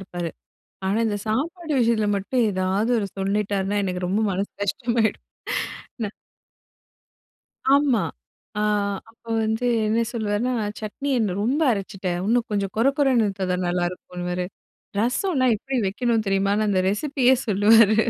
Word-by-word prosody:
இருப்பாரு, 175 -3 -5 0.6
ஆனா 200 +4 +1
இந்த 205 -1 -1
சாப்பாடு 315 - -2
விஷயத்தில 225 -3 +2
மட்டும் 235 +5 0
ஏதாவது 190 +4 0
ஒரு 200 -2 -2
சொல்லிட்டார்னா, 200 0 0
எனக்கு 180 -1 -2
ரொம்ப 205 +4 +1
மனசு 195 +2 -2
கஷ்டமாயிடும்! 230 +1 0 0.8
ந - - 0 1.6
ஆமா. 280 -4 +4 0.6
அ - - +1 0.5
அப்போ 230 0 -21
வந்து 220 +2 -1 0.2
என்ன 220 +2 +2
சொல்லுவாருன்னா, 220 +2 0 0.3
சட்னி 245 +7 -4
என்ன 210 -6 0
ரொம்ப 270 +8 +1
அரைச்சுட்டேன் 195 -3 -3
இன்னும் 235 +1 +2
கொஞ்சம் 200 -2 -1
கொர 230 - +3
கொர 285 -2 +3
இருந்தா 200 -3 0
தான் 180 0 -1
நல்லாயிருக்குன்னுவாரு, 180 0 -2 0.5
ரசம்லாம் 255 - +2
எப்படி 265 +5 -4
வைக்கணும் 225 +2 0
தெரியுமான்னு 195 +2 +2
அந்த 190 -2 +2
ரெசிப்பியே 260 +3 +3
சொல்லுவாரு! 215 +1 +6
210 Hz, 125 wpm, -24 LUFS, 195-235 Hz, 1.6 s, சொல்லுவாரு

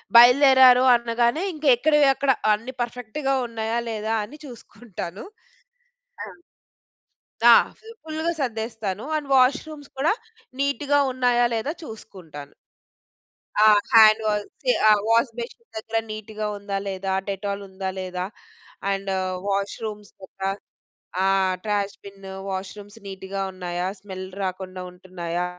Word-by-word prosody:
బయలుదేరారు. 255 +1 +8
అనగానే 235 +5 0
ఇంక 305 0 -8
ఎక్కడవి, 295 +3 +3
అక్కడ 275 -1 +2 0.2
అన్ని 230 +5 -4
పర్ఫెక్ట్‌గా 250 +4 -3
ఉన్నాయా? 225 0 -3
లేదా? 220 0 -2
అని 295 +8 -13
చూసుకుంటాను. 210 -6 -9 1.0
ఆ! - - -5 1.2
ఆ! - - +11 0.3
జుప్ 450 0 -14
ఫుల్‌గా 315 +2 -2
సర్దేస్తాను. 220 -4 -3
అండ్ 295 -2 -3
వాష్‌రూమ్స్ 285 +3 +1
కూడా 310 +8 +2 0.5
నీట్‌గా 280 +1 +1
ఉన్నాయా? 245 -1 +2
లేదా? 225 +7 -2
చూసుకుంటాను. 175 - -11 1.1
ఆ! 215 - +6 0.3
హ్యాండ్ 220 -1 +7
వాసే 210 - -1 0.2
ఆ! - - +8 0.2
వాష్ 230 +2 +3
బషీన్ 260 - -8
దగ్గర 225 +1 -2
నీట్‌గా 215 0 -6
ఉందా? 200 -1 -4
లేదా? 190 0 -3 0.2
డెటాల్ 200 +1 -3
ఉందా 190 0 -4
లేదా? 180 -1 -4 0.7
అండు 195 -1 -2 0.3
వాష్‌రూమ్స్ 205 +1 -3
దేక్క 190 0 -15 0.8
ఆహ్, 190 -1 +2
ట్రాష్ 205 -1 -1
బిను, 195 -1 -11 0.2
వాష్‌రూమ్స్ 200 +2 -7
నీట్‌గా 195 0 -6
ఉన్నాయా? 180 -1 -4
స్మెల్ 190 -1 -8 0.2
రాకుండా 185 -1 -4
ఉంటున్నాయా? 180 -1 -5
215 Hz, 115 wpm, -24 LUFS, 195-250 Hz, 1.2 s, ఆ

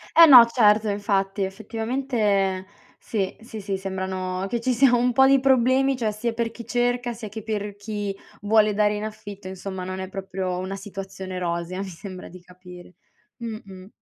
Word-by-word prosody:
Eh 335 - +10
no, 250 -6 +10
certo 215 -2 +3
infatti, 200 -1 0
effettivamente 210 -2 -1 0.3
sì, 195 -4 -3
sì, 225 -2 -8
sì, 195 -1 -3
sembrano 190 -1 -3
che 235 - -1
ci 255 +1 +1
sia 255 +1 +4
un 245 +1 +2
po' 265 +1 +6
di 275 0 +5
problemi, 265 +1 +3
cioè 225 -3 0
sia 225 +2 -3
per 230 0 -2
chi 235 0 -10
cerca, 245 0 0
sia 220 -2 -8
che 215 +1 -8
per 210 -2 -3
chi 205 -1 -4 0.3
vuole 210 0 +3
dare 210 0 +2
in 210 - -4
affitto, 205 -2 -8
insomma 190 0 -6
non 185 +1 -5
è 190 0 -5
proprio 190 -1 -4
una 190 +1 -4
situazione 190 -2 -7
rosea, 170 +1 -3
mi 200 - -5
sembra 185 +1 -9
di 185 - -12
capire. 180 0 -14 0.4
Mh-mh. 215 -6 -8
205 Hz, 175 wpm, -24 LUFS, 190-235 Hz, 0.4 s, Eh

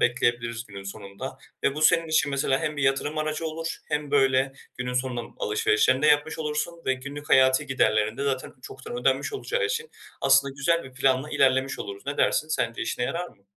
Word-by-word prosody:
bekleyebiliriz 120 -1 0
günün 100 -1 -9
sonunda. 100 +6 -8 0.3
Ve 140 - +2
bu, 155 - -3
senin 165 +1 +4
için 150 -2 +2
mesela, 135 -1 +1
hem 150 - -2
bir 145 - -2
yatırım 135 +3 +1
aracı 155 +1 -2
olur 165 +1 -4
hem 150 -1 -2
böyle 135 -1 +3 0.3
günün 125 0 -3
sonunda 125 -1 -1 0.2
alışverişlerini 425 - +2
de 155 - +4
yapmış 150 +1 +3
olursun 155 +2 -3
ve 130 - +3
günlük 140 +3 -8
hayati 130 0 +5
giderlerin 110 -4 +1
de 140 - -3
zaten 135 -2 -2
çoktan 455 +4 -8
ödenmiş - - +1
olacağı - - -1
için 460 +1 -2 0.3
aslında 135 0 +4
güzel 170 +4 +1
bir 130 - -11
planla 135 +2 +1
ilerlemiş 130 0 +2
oluruz. 100 +4 -7
Ne 140 - -2
dersin, 155 - +2
sence 125 -6 -1
işine 120 +2 -2
yarar 175 +7 -3
mı? 100 - -23
135 Hz, 190 wpm, -26 LUFS, 130-155 Hz, 0.3 s, hayati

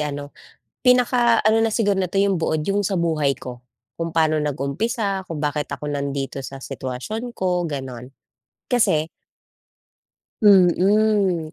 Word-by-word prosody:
ano, 145 -1 -4 0.5
pinaka-ano 240 -3 +4
na 225 -1 +1
siguro 205 -4 +1
nito 190 +1 0
yong 195 -2 +2
buod 160 -1 -1
yung 200 +4 0
sa 195 - -1
buhay 160 -6 +1
ko, 125 -1 -7 0.4
kung 165 -1 -4
paano 155 -1 +2
nag-umpisa, 190 - -2
kung 160 -4 -6
bakit 150 -1 -1
ako 150 - -5
nandito 140 -1 -3
sa 135 0 -9
sitwasyon 215 - -5
ko 180 -3 -1
gano'n, 130 -4 -6 0.6
kasi 220 -11 +3 1.4
Mm, 195 -2 +4
170 Hz, 125 wpm, -22 LUFS, 145-205 Hz, 1.4 s, pinaka-ano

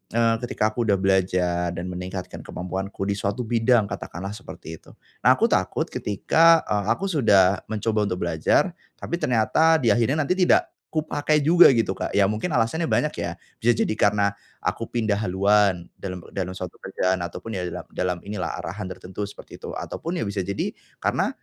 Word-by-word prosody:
eee, 115 -1 +3
ketika 110 -3 -1
aku 115 0 -2
sudah 100 - +4
belajar 90 -2 +1
dan 90 +1 -4
meningkatkan 90 +1 -6
kemampuanku 95 +2 -5
di 100 0 -1
suatu 100 +4 -2
bidang 115 -2 +2
katakan 90 - -6
lah 100 - -4
seperti 80 -6 -9
itu - - -18 0.2
nah - - +5
aku - - +1
takut - - +1
ketika, 165 +11 +3
eee, 100 -1 -1
aku 195 0 -3
sudah 100 - +4
mencoba 110 0 0
untuk 90 -2 -2
belajar 85 - +2 0.2
tapi 170 - -4
ternyata 125 - +3
di 115 - +4
akhirnya 125 +8 +2
nanti 140 - -3
tidak 190 - +4 0.3
kupakai 155 -1 0
juga 175 +2 +8
gitu 115 -7 +2
Kak - - -3
ya 100 - +5
mungkin 105 - -1
alasannya 150 +6 0
banyak 150 - +1
ya, 85 0 -4 0.2
bisa 120 0 +3
jadi - - +1
karena 100 -1 +2 0.2
aku - - -3
pindah 110 -3 0
haluan 100 -2 +2
dalam 90 -3 -7
dalam 95 -1 -3
suatu 90 -1 -7
kerjaan, 95 -1 -1
ataupun 85 +6 -6
ya 95 - -2
dalam - - -7
dalam 90 -1 -1
inilah 105 -2 -4
arahan 95 +2 -5
tertentu 95 +2 -8
seperti 100 0 -8
itu, - - -7
ataupun 170 +2 -5
ya 115 - -1
bisa 100 -1 -2
jadi 100 +2 -3 0.2
karena - - 0
105 Hz, 180 wpm, -24 LUFS, 95-120 Hz, 0.3 s, juga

